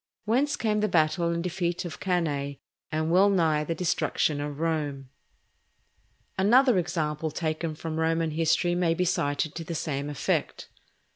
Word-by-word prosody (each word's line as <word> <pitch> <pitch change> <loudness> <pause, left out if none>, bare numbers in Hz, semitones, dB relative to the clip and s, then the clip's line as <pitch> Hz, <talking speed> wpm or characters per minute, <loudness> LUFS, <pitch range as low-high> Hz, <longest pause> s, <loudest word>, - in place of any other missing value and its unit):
Whence 270 +7 +2
came 215 -2 0
the 215 - +2
battle 170 -1 +2
and 170 0 -1
defeat 175 0 -2
of 175 - -7
Cannæ, 145 -7 -1 0.3
and 155 +1 -1
well 190 +3 +5
nigh 160 -6 +2
the 165 +2 -3
destruction 160 -3 0
of 145 0 -5
Rome. 145 -5 -2 1.3
Another 240 +2 +5
example 160 -3 -2
taken 155 +1 -3
from 160 +1 -4
Roman 165 0 +1
history 165 +2 +1
may 175 -2 +1
be 180 - 0
cited 145 -3 0
to 165 - -5
the 165 +1 -5
same 145 -2 -3
effect. 145 - -2
165 Hz, 150 wpm, -27 LUFS, 155-180 Hz, 1.3 s, well